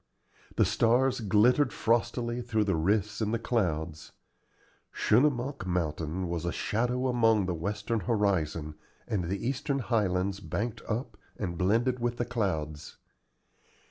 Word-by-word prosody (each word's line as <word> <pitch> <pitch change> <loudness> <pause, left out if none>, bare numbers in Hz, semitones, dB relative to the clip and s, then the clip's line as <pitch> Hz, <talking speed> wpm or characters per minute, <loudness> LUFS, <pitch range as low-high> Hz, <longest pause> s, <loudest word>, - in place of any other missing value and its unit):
The - - +4
stars 120 +6 +2
glittered 120 +5 +3
frostily 120 +1 0
through 115 -3 0
the 100 -3 +1
rifts 100 +6 0
in 105 - +1
the 115 - +1
clouds. 85 -10 -2 0.8
Schunemunk 130 -1 +1
Mountain 85 0 -2
was 85 -1 -3
a 85 - -1
shadow 125 +6 0
along 115 -5 +3
the 90 - -1
western 105 +7 -2
horizon, 85 -7 0 0.3
and 95 -5 -1
the 100 +6 -3
eastern 135 +2 -1
highlands 100 -6 0
banked 110 +2 -3
up 115 +5 -3 0.2
and 90 -5 -3
blended 115 +8 +1
with 120 0 -1
the 120 - -1
clouds. 80 -11 -3
105 Hz, 130 wpm, -29 LUFS, 90-120 Hz, 0.8 s, The